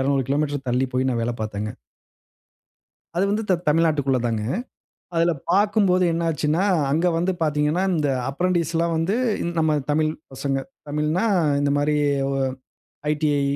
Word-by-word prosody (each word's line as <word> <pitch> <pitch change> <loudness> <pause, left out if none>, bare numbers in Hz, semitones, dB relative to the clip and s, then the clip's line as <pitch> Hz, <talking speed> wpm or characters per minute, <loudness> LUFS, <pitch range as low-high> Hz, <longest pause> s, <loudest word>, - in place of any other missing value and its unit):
200 135 0 +1
kilometre 145 -1 -1
தள்ளி 125 +2 +1
போய் 130 +1 +1
நான் 120 -2 -1
வேல 120 +1 -1
பார்த்தேங்க. 105 0 -3 1.5
அது 180 - +2
வந்து 215 +2 0
த 185 - +5
தமிழ்நாட்டுக்குள்ள 150 -4 +2
தாங்க. 110 -2 -1 0.7
அதுல 165 +1 +3 0.2
பார்க்கும்போது 200 -2 +3
என்ன 170 +1 -1
ஆச்சுன்னா, 155 +3 0 0.3
அங்க 165 +5 +2
வந்து 180 +3 +1
பார்த்தீங்கன்னா 150 +3 +1
இந்த 155 -4 +1 0.2
அப்ரென்டிஸ் 170 +2 0
லாம் 170 0 +1
வந்து 165 +6 0 0.3
இந் 170 0 -3
நம்ம 160 -1 +2 0.2
தமிழ் 155 +1 +2 0.2
பசங்க. 135 +1 -1 0.3
தமிழ்ன்னா 150 +7 0 0.3
இந்தமாரி 145 +1 +1 0.3
ஒ - - -1 0.8
ஐடிஐ 150 -2 +1
150 Hz, 135 wpm, -23 LUFS, 140-170 Hz, 1.5 s, த